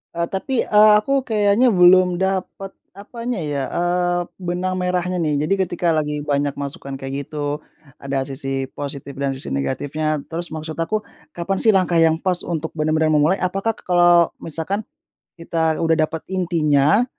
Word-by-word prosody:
Eee, 170 0 -1
tapi, 260 +8 -3
eee, 210 0 +6
aku 275 +4 0
kayaknya 220 +1 +3
belum 180 -1 +5
dapat, 190 0 -3 0.2
apanya 230 +3 -6
ya, 145 -3 -2
eee, 175 0 0 0.2
benang 180 +1 -2
merahnya 180 0 -1
nih. 150 -2 0
Jadi 195 - +2
ketika 175 -2 0
lagi 150 -1 -1
banyak 145 -1 0
masukan 140 -1 -6
kayak 135 +1 -4
gitu, 150 -1 -4 0.3
ada 135 0 -3
sisi 135 -1 -3
positif 140 -1 -6
dan 140 0 -1
sisi 135 - -6
negatifnya, 145 - -2
terus 170 0 -5
maksud 155 0 -6
aku, 190 +6 -1 0.3
kapan 175 +3 -2
sih 220 - +6
langkah 185 -3 +2
yang 160 -1 +4
pas 180 0 -1
untuk 160 -2 -4
benar-benar 155 0 +1
memulai? 155 +5 +3
Apakah 195 +5 0
kalau 175 -1 +4 0.2
misalkan 165 +6 -3 0.5
kita 165 -1 -1
udah 160 0 +3
dapat 160 - -6
intinya, 170 - +2
170 Hz, 155 wpm, -21 LUFS, 150-185 Hz, 0.5 s, eee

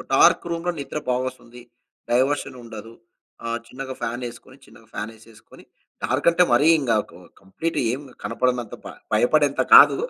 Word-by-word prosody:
ఒ - - -6
డార్క్ - - +5
రూమ్‌లో 170 +1 -1
నిద్ర 145 +2 -5
బా 125 - +3
ఒస్తుంది. 120 -1 -13 0.5
డైవర్షనుండదు. 120 -4 -1 0.5
ఆహ్, 115 0 -2
చిన్నగా 130 +2 -7
ఫ్యానేసుకొని 120 +2 -6
చిన్నగా 115 -1 -19
ఫ్యానేసేసుకొని, 110 +1 -10 0.4
డార్కంటే 170 +7 +3
మరీం 155 +5 +5
గాకు 105 -4 -1 0.2
కంప్లీట్ 100 +13 -4
ఏం 130 - -2 0.2
కనపడనంత 120 +1 -1
బ - - -7 0.2
భయపడేంత 140 +6 +3
కాదు. - - +9
120 Hz, 125 wpm, -23 LUFS, 115-140 Hz, 0.5 s, కాదు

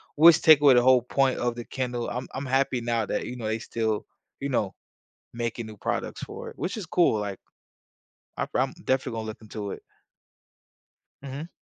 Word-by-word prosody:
which 165 +2 +8
take 155 -3 +8
away 140 -3 +8
the 120 - +6
whole 130 -1 +6
point 135 +1 +1
of 120 0 0
the 120 - -6
Kindle; 125 -2 -3
I'm 125 +1 -4
I'm 135 +2 -4
happy 130 -1 +1
now 115 -2 0
that, - - -2
you 125 - -5
know, 115 -3 -6
they 110 +1 -1
still, 110 -2 -2 0.3
you 140 - -3
know, 105 -7 0 0.6
making 115 -1 -3
new 110 -1 -10
products - - -3
for - - -8
it, - - -17
which 190 - -3
is 205 -6 -5
cool, 160 -12 +3
like 100 -2 -4 1.0
I, - - 0
from - - 0
definitely 130 -1 0
gonna 110 - -5
look 110 - -7
into 105 -2 -6
it. - - -7 1.4
Mhm. 140 +5 -6
125 Hz, 190 wpm, -26 LUFS, 110-135 Hz, 1.4 s, which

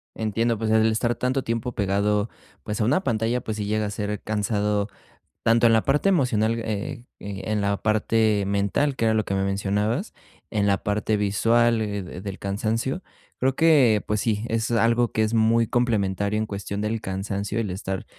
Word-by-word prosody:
Entiendo. 115 +2 0
Pues 110 +1 -2
el 110 0 +4
estar 120 +2 0
tanto 130 +1 -1
tiempo 115 +1 -2
pegado, 105 +1 0 0.3
pues 105 -1 -4
a - - +2
una 150 - +2
pantalla, 115 +2 0
pues 110 -1 -4
sí 105 - -3
llega 110 +1 0
a 105 - -2
ser 105 0 -3
cansado, 105 -1 0 0.6
tanto 115 +1 +4
en 115 - +4
la 110 - +3
parte 150 +8 +2
emocional, 115 - +2
eh 110 +1 -4 0.2
eh, 100 -1 -6
en 105 -1 +1
la 100 0 0
parte 110 -1 +2
mental, 100 +8 0
que 115 - 0
era 110 - +3
lo 110 -1 +1
que 100 - -3
me 95 - +1
mencionabas. 105 - -1 0.4
En 105 -2 0
la 100 -1 +3
parte 105 0 0
visual 115 +3 +2
de 100 -4 -4
del 100 -2 -6
cansancio. 115 - -2 0.4
Creo 130 +1 +1
que, 135 -10 +4
pues 105 0 0
sí, 110 -1 -1
es 115 +1 -1
algo 115 +1 +2
que 110 - 0
es 110 +1 -1
muy 115 0 +3
complementario, 105 -3 0
en 110 - 0
cuestión 100 0 -4
del 110 +1 -2
cansancio, 100 +3 -3
el 105 - -2
estar, 95 +1 -4
110 Hz, 190 wpm, -24 LUFS, 100-115 Hz, 0.6 s, el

